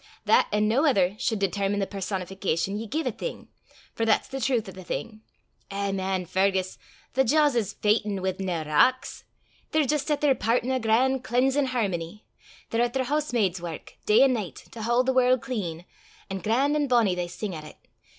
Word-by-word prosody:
That - - +4
an' 210 0 +2
no 240 +7 +2
ither 195 -8 +2
sud 220 - 0
determine 200 +1 0
the 195 - +1
personification 190 -1 -2
ye 220 +2 -4
gie 310 +10 -1
a - - -1
thing - - -7 0.4
for 225 - -2
that's 225 -1 +2
the 270 - -5
trowth 235 -3 +1
o' - - -7
the 185 0 -11
thing. 215 +4 -5 0.5
Eh, 200 0 -2
man, 190 -1 -2
Fergus! 190 +1 0 0.3
the 265 - +3
jaws 295 +3 +3
is 215 -4 -1
fechtin' 210 -1 +1
wi' 190 0 0
nae 180 -4 -2
rocks. 155 +13 +1 0.4
They're 310 -1 +2
jist 300 +2 -1
at 295 - +1
their 290 -2 +4
pairt 230 0 +1
in 255 - -2
a 260 - +1
gran' 250 +4 +2
cleansin' 265 +3 +1
hermony. 205 -6 -2 0.5
They're 230 - +1
at 240 0 +1
their 265 -1 0
hoosemaid's 240 - 0
wark, 170 -2 -8
day 215 +5 +6
an' 270 -1 +4
nicht, 210 -7 -6
to 230 - -8
haud 240 +3 +2
the 260 - +2
warl' 255 0 +4
clean, 200 -11 -5 0.5
an' 195 - -3
gran'; 255 - +1
an' 295 -1 +1
bonnie 235 -7 +3
they 180 -1 -2
sing 190 +3 -5
at 155 -2 -7
it. 155 - -12
220 Hz, 200 wpm, -26 LUFS, 190-255 Hz, 0.5 s, day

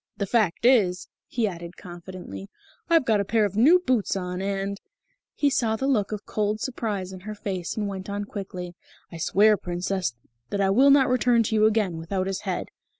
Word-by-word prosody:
The 200 - -1
fact 215 -2 +1
is," 195 -8 +3 0.2
he 235 -3 0
added 170 -2 -7
confidently, 175 - -9 0.4
"I've 330 -5 +4
got 220 -3 +3
a - - +1
pair 215 +2 +2
of 200 -1 -4
new 280 - +6
boots 255 - 0
on, 180 -1 -3
and 195 0 -3 0.3
" - - -44 0.2
He 285 -1 +2
saw 225 -4 +1
the 265 - -3
look 220 -8 +1
of 210 -1 -5
cold 210 0 -1
surprise 210 -7 -3
in 185 - -8
her 215 +3 -7
face 190 -3 -4
and 210 -1 -1
went 190 -1 -6
on 205 0 -3
quickly, 185 -4 -7 0.4
"I 170 - -7
swear, 205 +6 +4
Princess, 180 -6 -2 0.3
that 200 - -2
I 195 -1 +3
will 265 +7 +5
not 275 -1 +6
return 245 -2 +3
to 220 - -3
you 215 0 +4
again 210 -6 0
without 185 +3 -2
his 195 0 -2
head." - - -3
200 Hz, 205 wpm, -25 LUFS, 185-220 Hz, 0.4 s, new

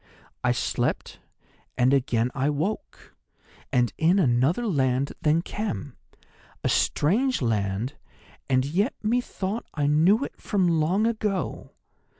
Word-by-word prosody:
"'I 125 - +3
slept, 115 - -2 0.6
and 130 +1 +4
again 125 -3 +1
I 140 0 0
woke, 160 +9 -4 0.6
and 120 -2 +2
in 170 +4 +4
another 145 - +2
land 135 - +1
than 160 +1 +2
Khem—a 205 - -4 0.8
strange 240 - +2
land, 110 +1 -1 0.6
and 130 0 +3
yet 190 - 0
methought 220 -2 -2
I 145 -2 0
knew 165 - +4
it - - -11
from 195 -4 +1
long 185 +8 +2
ago. 215 -5 -2
150 Hz, 115 wpm, -25 LUFS, 130-205 Hz, 0.8 s, and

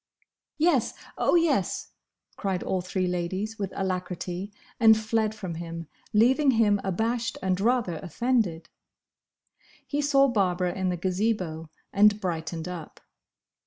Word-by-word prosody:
"Yes! 310 -6 +2 0.2
Oh, - - +2
yes!" 310 - +1 0.4
cried 190 -3 -2
all 185 - -1
three 185 +1 -2
ladies, 185 +5 -2
with 195 -2 -2
alacrity, 185 0 -3 0.3
and 220 -2 +7
fled 220 0 0
from 190 -5 -5
him, 165 0 -6 0.3
leaving 260 +7 +4
him 220 -5 +3
abashed 225 +5 -1
and 190 0 0
rather 225 -7 +1
offended. 185 - -1 1.2
He 290 0 -1
saw 275 -1 +4
Barbara 185 -6 +1
in 190 -1 -1
the 180 - -1
Gazebo, 180 -3 -1 0.2
and 210 +1 +5
brightened 165 -3 -3
up. 175 -4 -7
195 Hz, 125 wpm, -27 LUFS, 180-225 Hz, 1.2 s, and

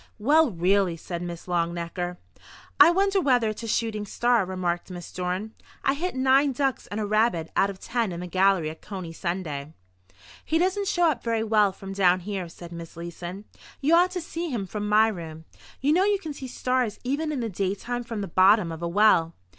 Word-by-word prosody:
"Well, 295 +7 +4
really!" 185 -1 +1
said 170 +1 -6
Miss 175 -1 -6
Longnecker. 175 0 -2 0.6
"I - - +9
wonder 390 +2 +2
whether 245 -7 +3
it's 215 - -5
a 230 - -6
shooting 215 -2 -1
star," 240 -1 +2
remarked 180 -2 -2
Miss 175 -2 -8
Dorn. 185 +4 -3 0.3
"I 270 - +4
hit 345 +4 -3
nine 265 +2 +3
ducks 270 0 -1
and 205 - -4
a 215 - -1
rabbit 210 -6 +1
out 195 - +3
of 195 -1 -8
ten 230 -3 -1
in 170 - -5
the - - -5
gallery 185 -3 +2
at 160 - -13
Coney 185 -5 -7
Sunday." 160 -5 -4 0.7
"He 320 - 0
doesn't 380 +3 0
show 345 -3 +3
up 245 - -6
very 230 -1 0
well 210 -2 +3
from 195 +1 -9
down 185 -2 +3
here," 190 -2 -4
said 170 0 -11
Miss 170 -1 -9
Leeson. 175 +3 -7 0.3
"You 295 +4 +2
ought 350 +2 +5
to 360 - -3
see 335 +1 -4
him 230 -8 -2
from 210 +2 -4
my 215 +1 +5
room. 165 -6 -6 0.4
You 285 +3 +3
know 365 +3 +4
you 410 0 +3
can 320 -6 -6
see 270 -2 -7
stars 250 -3 -1
even 290 +5 -1
in 290 - -2
the 230 - -1
daytime 205 +6 -3
from 230 -3 -5
the 200 - -3
bottom 185 0 +4
of 165 0 -7
a 170 - -1
well. 170 -3 +3
205 Hz, 205 wpm, -26 LUFS, 175-255 Hz, 0.7 s, I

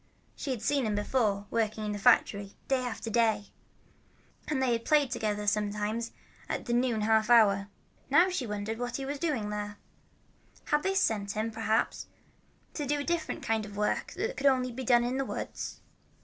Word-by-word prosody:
She 285 - -5
had 245 -4 -2
seen 280 -5 +1
him 210 - 0
before, 205 -2 0
working 220 -1 0
at 210 - -2
the 205 - -4
factory, 200 0 +3
day 265 -1 +2
after 230 -2 -4
day, 220 -3 +2 1.0
and 300 -3 0
they 260 -2 +2
had 230 -1 0
played 295 -3 +3
together 210 -2 -1
sometimes 210 +2 -1 0.4
in - - -2
the 240 - -2
noon 240 -2 +1
half 220 +1 +3
hour. 200 -4 +5 0.4
Now 345 +7 +5
she 275 -10 -2
wondered 210 +2 -3
what 245 -1 -3
he 270 - -3
was 285 +1 -4
doing 295 -9 0
out - - -4
there. 205 0 -4 0.9
Had 295 0 +2
they 385 +3 0
sent 205 - +1
him, 220 +1 -2
perhaps, 220 0 0 0.7
to 295 -3 -3
do 295 +2 +1
a - - -3
different 340 +2 -2
kind 225 -1 0
of 205 -1 -9
work 210 0 -1
that 450 +7 -3
could 285 - +2
only 255 -2 +3
be 260 +2 -5
done 240 -1 +4
in 250 +2 -1
the 270 - 0
woods? - - -5
230 Hz, 190 wpm, -30 LUFS, 210-265 Hz, 1.0 s, hour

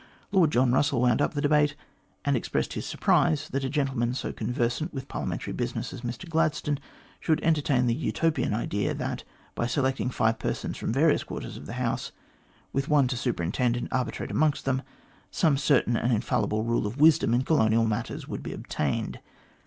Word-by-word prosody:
Lord 185 -6 +4
John 125 -1 +3
Russell 135 0 +2
wound 125 +1 +3
up 150 - 0
the 145 - 0
debate, 150 0 +3 0.5
and 140 -1 +2
expressed 120 - -1
his - - -4
surprise 155 -1 +2
that 135 0 -2
a 135 - -1
gentleman 135 -4 0
so - - -3
con - - -3
versant 125 +7 -1
with 135 0 -5
Parliamentary - - -4
business - - -3
as - - -7
Mr 120 +9 -5
Gladstone 155 -3 0 0.4
should 160 -2 +1
entertain 145 -6 +2
the 120 - +2
Utopian 160 +4 0
idea 105 -2 -1
that, - - -3 0.3
by 120 - -1
selecting 130 -1 0
five 110 -2 +1
persons - - -3
from - - -2
various 145 +5 +3
quarters - - -6
of - - -9
the - - -6
House, - - -2 0.6
with 135 +1 -1
one 145 -3 +4
to 130 - -1
superintend 120 +1 0
and 120 - -3
arbitrate 130 -2 -2
amongst 155 -2 +1
them, 130 -1 +1 0.5
some 155 -4 +2
certain 135 -4 +2
and 120 +2 +1
infallible 110 -1 0
rule 115 -2 0
of 120 +7 -6
wisdom 155 -6 +5
in 125 - +2
colonial 115 -7 +3
matters 110 -2 -3
would - - -5
be - - -5
obtained. 70 -3 -2
130 Hz, 185 wpm, -27 LUFS, 120-150 Hz, 0.6 s, wisdom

